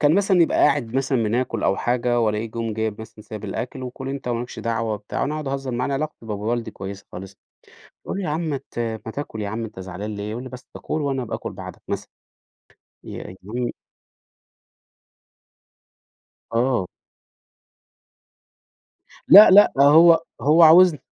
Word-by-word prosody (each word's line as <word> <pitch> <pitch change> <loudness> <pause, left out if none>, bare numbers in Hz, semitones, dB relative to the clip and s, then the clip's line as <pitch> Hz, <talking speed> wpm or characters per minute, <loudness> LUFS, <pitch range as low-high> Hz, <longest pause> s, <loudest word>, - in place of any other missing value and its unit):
كان 150 +2 +4
مثلًا 190 -3 +3
يبقى - - +1
قاعد 120 -4 +2
مثلًا 135 -3 0
بناكل 115 0 -1
أو 95 - +1
حاجة 120 0 0
وألاقيه 110 0 0
جم 115 -1 -4
جايب 110 -1 -3
مثلًا 110 0 -12
سايب 110 -1 -8
الأكل، 130 +2 -5
"وكُل 130 +1 -7
أنت 135 -2 -5
وما 120 0 -1
لكش 125 - -9
دعوة 115 -1 -2
وبتاع." 105 0 -5
وأنا 145 +2 -1
أقعد 155 -3 -4
أهزر 135 -1 -3
معاه 125 +1 -2
أنا 140 - -2
علاقتي 150 -5 -5
بابو 105 +1 -3
والدي 120 -2 -2
كويسة 95 0 -9
خالص، 95 +2 -9 0.7
باقوله 200 - -4
له: 180 - -3
"يا 150 - -1
عم 165 - -2
مات 140 -2 -6
ما 110 -1 -4
تاكل 110 -7 -6
يا 100 - -3
عم 115 +2 -4
أنت 105 -4 -9
زعلان 95 +3 -6
ليه؟" 105 +1 -5
يقول 120 +3 -5
لي: 130 - -8
"بس 125 0 -12
كُل 155 - -3
وأنا 135 -3 -2
أبقى 115 - -4
آكُل - - -7
بعدك." - - -10
مثلًا، - - -4 1.0
ي - - -8 0.2
ي 120 +5 -4 2.8
آه. 120 -5 +1 2.4
لأ، 210 +3 +10
لأ 205 +2 +7
هو 165 +3 +7 0.2
هو 155 +5 +5
عاوزن 165 0 +7
120 Hz, 170 wpm, -22 LUFS, 110-145 Hz, 2.8 s, لأ